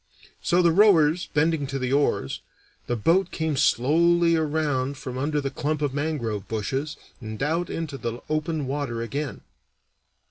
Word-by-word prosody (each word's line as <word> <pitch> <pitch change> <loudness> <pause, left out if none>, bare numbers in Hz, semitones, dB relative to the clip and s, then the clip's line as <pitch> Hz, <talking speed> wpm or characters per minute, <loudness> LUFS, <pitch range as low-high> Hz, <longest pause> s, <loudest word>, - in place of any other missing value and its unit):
So, 175 +1 +2
the 170 - +5
rowers 175 -4 +4
bending 150 -1 +1
to 135 0 -3
the 130 0 -1
oars, 120 - 0 0.5
the 120 - 0
boat 170 - +2
came 160 -3 -2
slowly 165 +6 +3
around 145 -4 0
from 130 -3 -6
under 150 +3 -1
the 140 -1 -3
clump 150 +2 -2
of 140 -2 0
mangrove 140 -9 -2
bushes 135 +7 -3 0.2
and 110 -3 -7
out 165 +4 0
into 155 -4 -4
the 120 0 -4
open 155 -1 -1
water 130 -4 -3
again. 140 +4 -4
145 Hz, 150 wpm, -25 LUFS, 130-160 Hz, 0.5 s, the